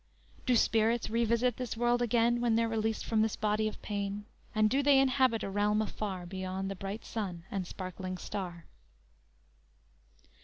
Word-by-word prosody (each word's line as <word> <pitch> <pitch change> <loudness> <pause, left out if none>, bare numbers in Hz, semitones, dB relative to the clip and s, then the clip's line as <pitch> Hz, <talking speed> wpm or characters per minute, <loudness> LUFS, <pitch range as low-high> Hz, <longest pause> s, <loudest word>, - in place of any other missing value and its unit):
_Do 250 -2 +5
spirits 225 +1 +2
revisit 235 +1 +2
this 250 -3 -4
world 240 +1 +2
again 240 0 +2
When 235 -2 +3
they're 230 0 +3
released 225 -1 -1
from 220 -1 +2
this 220 -1 +1
body 215 0 +1
of 215 - -6
pain, 205 0 -3 0.3
And 215 0 +4
do 265 +6 +2
they 285 -1 +5
inhabit 260 -4 +3
a - - -2
realm 205 +1 +2
afar 200 -4 -3
Beyond 190 +1 -4
the - - -4
bright 195 +4 -6
sun 185 -7 -4
and 190 -3 -2
sparkling 185 0 -5
star? 175 -2 -5
215 Hz, 160 wpm, -31 LUFS, 195-235 Hz, 0.3 s, Do